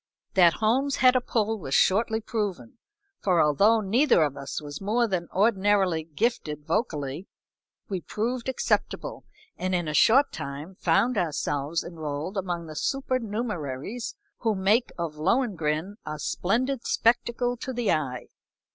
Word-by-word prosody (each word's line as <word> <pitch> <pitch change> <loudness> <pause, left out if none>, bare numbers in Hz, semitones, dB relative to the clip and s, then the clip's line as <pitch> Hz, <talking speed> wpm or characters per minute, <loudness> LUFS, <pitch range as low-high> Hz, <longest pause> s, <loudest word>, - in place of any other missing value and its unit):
That 175 -3 +6
Holmes 260 +6 +1
had 255 0 +5
a 255 - +3
pull 220 -2 -1
was 135 -5 -2
shortly 220 +3 +3
proven, 220 +2 -4 0.4
for 180 -4 +2
although 200 +10 +4
neither 225 - +4
of 145 -2 -1
us 140 - -5
was 145 +1 -8
more 230 +4 +1
than 180 -4 -2
ordinarily 195 -4 +2
gifted 155 -4 -2
vocally, 155 - -2 0.6
we 190 -3 -3
proved 235 +6 -3
acceptable 260 - -1 0.3
and 185 0 0
in 175 -2 -1
a 150 - -2
short 265 - +5
time 140 +6 -6
found 195 +7 +2
ourselves 150 -1 -1
enrolled 160 +2 -5
among 175 -3 -3
the 155 -1 -9
supernumeraries 225 - -3 0.2
who 225 -3 +1
make 205 +6 +2
of 165 -3 -4
"Lohengrin" 185 - 0
a 155 - -5
splendid 245 - -1
spectacle 240 +1 +1
to 260 - -5
the 240 -4 0
eye. 135 -6 -1
195 Hz, 140 wpm, -26 LUFS, 160-230 Hz, 0.6 s, That